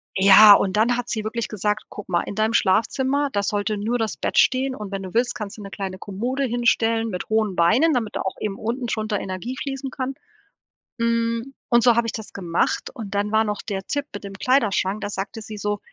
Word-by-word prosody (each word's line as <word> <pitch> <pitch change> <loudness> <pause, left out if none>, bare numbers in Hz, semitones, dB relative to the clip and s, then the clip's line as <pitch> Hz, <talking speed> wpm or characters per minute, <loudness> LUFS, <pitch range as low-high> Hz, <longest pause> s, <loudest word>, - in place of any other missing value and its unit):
Ja, 200 +2 +9
und 195 0 +2
dann 235 +3 +3
hat 245 0 -4
sie 220 -2 -2
wirklich 230 +2 -3
gesagt: 210 +1 -2
„Guck 205 - -9
mal, 175 -2 +2
in - - -7
deinem 220 +2 +1
Schlafzimmer, 265 +8 +2
da 200 0 0
sollte 205 +1 -1
nur 225 +4 -1
das 225 -3 -2
Bett - - -2
stehen, 260 0 +3
und 210 -4 -7
wenn 195 -1 -4
du 185 - -8
willst, 240 +2 +1
kannst 210 -2 -6
du - - -9
'ne 200 - -8
kleine 190 -2 -5
Kommode 240 +9 -3
hinstellen 230 -2 +1
mit 180 -3 -5
hohen 215 -3 +1
Beinen, 240 - +4
damit 225 -4 -2
da - - -1
auch 190 - -3
eben 205 -2 -3
unten 240 +3 -3
drunter 215 -2 -2
Energie 190 +7 -5
fließen 270 -1 -4
kann.“ 260 +1 -4 0.8
Hm, 230 +2 -1 0.2
und 235 0 +5
so 240 -1 +6
habe 235 -1 +2
ich - - -3
das 220 -2 -7
gemacht 175 -3 -1
und 220 -6 -7
dann 205 +1 -1
war 220 0 +4
noch 210 -1 -3
der 195 -3 -4
Tipp 285 0 -2
mit 205 - -7
dem 200 0 -7
Kleiderschrank. 210 -4 +1
Da - - -3
sagte 200 +2 -5
sie 215 0 -8
so 205 0 -2
215 Hz, 225 wpm, -23 LUFS, 200-240 Hz, 0.8 s, Ja